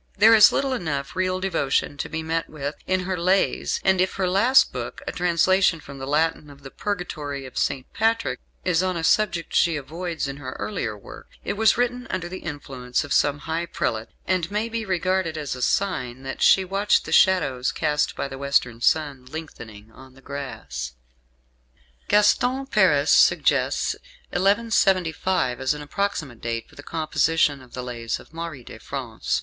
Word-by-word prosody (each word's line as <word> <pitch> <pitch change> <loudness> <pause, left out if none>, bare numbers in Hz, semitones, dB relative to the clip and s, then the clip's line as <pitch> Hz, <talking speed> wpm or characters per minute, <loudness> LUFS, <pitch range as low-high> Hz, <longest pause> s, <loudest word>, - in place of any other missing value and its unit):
There 220 +3 +7
is 215 -2 +8
little 275 -1 0
enough 145 - -3
real 185 0 0
devotion 165 -7 0
to - - -4
be 160 0 -4
met 165 +1 -2
with 145 -1 -4
in 185 0 +1
her 185 +1 -2
"Lays"; 185 +3 +1
and 190 -1 +3
if 185 - 0
her 190 -1 0
last 215 +9 +4
book - - -6
a - - -3
translation 180 0 +2
from 140 -2 -11
the 135 - -6
Latin 150 +1 0
of 140 0 -15
the 135 - -9
Purgatory 150 -8 -4
of 130 - -11
St. 135 -2 -1
Patrick 225 +1 0 0.3
is 180 -2 +2
on 185 -1 -1
a 165 - -3
subject 175 -2 +1
she 170 -1 +3
avoids 160 +3 -4
in 140 0 -6
her 130 -3 -7
earlier 120 - -3
work, 100 - -12 0.2
it 200 - -2
was 220 +1 +3
written 245 +1 -1
under 185 -2 -3
the 185 +2 -7
influence 135 -5 -4
of 145 - -3
some 145 0 +2
high 165 +2 -2
prelate, 110 -8 -2 0.2
and 180 -2 0
may 210 +3 -1
be 230 -1 -3
regarded 185 -3 0
as 145 -4 -3
a 125 - -8
sign 130 -9 -1
that 135 - -6
she 190 - +5
watched 195 +3 +1
the - - -6
shadows 145 -10 +3
cast 150 -1 0
by - - -3
the 135 0 -8
western 125 -4 0
sun 140 -2 +1
lengthening 115 -8 -9
on 130 +2 -15
the - - -16
grass. 110 - -6 1.1
Gaston 245 +6 +3
Paris 270 - +3
suggests - - +3 0.4
1175 185 - +1
as 130 +3 +1
an 150 - -7
approximate 150 - -3
date 115 -1 -3
for - - -22
the - - -10
composition 155 -2 +1
of 125 -2 -17
the 125 - -4
"Lays" 115 -2 -4
of - - -17
Marie 165 -6 -6
de - - -11
France. - - -3
160 Hz, 180 wpm, -24 LUFS, 135-190 Hz, 1.1 s, is